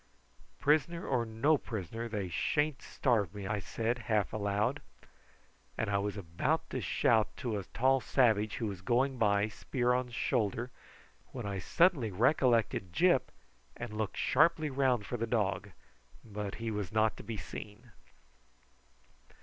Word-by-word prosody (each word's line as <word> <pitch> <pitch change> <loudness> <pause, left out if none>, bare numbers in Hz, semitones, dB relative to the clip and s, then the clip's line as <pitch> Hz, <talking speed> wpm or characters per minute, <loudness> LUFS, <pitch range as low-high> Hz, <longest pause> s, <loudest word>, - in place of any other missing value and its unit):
"Prisoner 155 +4 +2
or 120 -4 0
no 135 +7 +2
prisoner 115 +2 -5
they 105 -4 -3
sha'n't 150 - 0
starve 105 - 0
me," 100 -1 -6
I 105 +1 -1
said 115 +5 -2
half 105 -3 +1
aloud; 105 +6 0 1.0
and 110 -2 -1
I 100 - +2
was 105 0 -3
about 85 -4 -1
to - - -2
shout 110 -2 +2
to 115 -6 -2
a 95 - -7
tall 135 +6 +2
savage 110 -6 +2
who 115 - -3
was 100 -4 -4
going 125 +5 +1
by 100 -1 +3
spear 120 +4 -1
on 125 0 0
shoulder, 120 0 -1 0.6
when 125 -4 -5
I 100 -1 -3
suddenly 155 - +3
recollected 115 - +2
Gyp 175 - +3 0.5
and 115 -2 -6
looked 105 -1 -3
sharply 155 +1 +3
round 130 -5 +1
for 120 - -3
the 115 0 -2
dog, 105 -2 0 0.6
but 105 -2 -5
he 115 0 -4
was 105 -2 -3
not 110 0 +2
to - - -9
be 115 -2 -5
seen. 105 +5 -9
115 Hz, 150 wpm, -32 LUFS, 105-125 Hz, 1.0 s, by